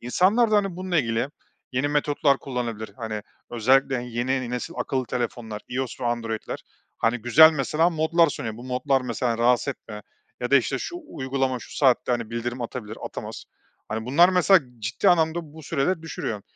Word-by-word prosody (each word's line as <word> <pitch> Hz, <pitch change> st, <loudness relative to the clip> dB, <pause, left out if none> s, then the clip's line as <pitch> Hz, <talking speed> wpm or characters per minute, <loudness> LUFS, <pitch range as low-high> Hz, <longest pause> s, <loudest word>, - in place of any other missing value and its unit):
İnsanlar 195 Hz, -, +3 dB
da, 215 Hz, -, +4 dB
hani, 195 Hz, -4 st, 0 dB
bununla 185 Hz, -2 st, 0 dB
ilgili 115 Hz, 0 st, 0 dB, 0.4 s
yeni 130 Hz, +3 st, 0 dB
metotlar 145 Hz, -1 st, +2 dB
kullanabilir, 120 Hz, -4 st, -4 dB
hani, 110 Hz, -4 st, -4 dB, 0.3 s
özellikle 130 Hz, +2 st, +2 dB
yeni 125 Hz, +1 st, -2 dB
nesil 125 Hz, +8 st, -4 dB
akıllı 130 Hz, -2 st, -1 dB
telefonlar, 115 Hz, -3 st, -4 dB
iOS 130 Hz, 0 st, -4 dB
ve -, -, -3 dB
Android’ler, 115 Hz, -2 st, -3 dB, 0.4 s
hani, 115 Hz, +2 st, +1 dB
güzel 145 Hz, +8 st, +7 dB
mesela 155 Hz, +3 st, +1 dB
modlar 165 Hz, +1 st, +3 dB
sunuyor. 115 Hz, -6 st, -5 dB
Bu 120 Hz, -, -10 dB
modlar 130 Hz, +2 st, +1 dB
mesela 120 Hz, -1 st, -2 dB
rahatsız 120 Hz, +2 st, +3 dB
etme 105 Hz, -5 st, -6 dB, 0.4 s
ya 125 Hz, -, -2 dB
da, 140 Hz, -, +7 dB
işte, 135 Hz, +1 st, +1 dB
şu 350 Hz, -, -5 dB
uygulama 130 Hz, -1 st, -1 dB
şu -, -, -11 dB
saatte, 130 Hz, -2 st, +3 dB
hani, 115 Hz, -2 st, -2 dB
bildirim 120 Hz, +1 st, -3 dB
atabilir, 110 Hz, -2 st, -6 dB
atamaz, -, -, -7 dB, 0.4 s
hani, 110 Hz, +1 st, -4 dB
bunlar 160 Hz, +8 st, +6 dB
mesela 185 Hz, 0 st, +5 dB, 0.2 s
ciddi 115 Hz, -, 0 dB
anlamda 160 Hz, -1 st, +2 dB, 0.2 s
bu 160 Hz, -, -11 dB
süreleri 160 Hz, +4 st, -1 dB
düşürüyor. 115 Hz, -9 st, -4 dB
130 Hz, 165 wpm, -25 LUFS, 120-155 Hz, 0.4 s, güzel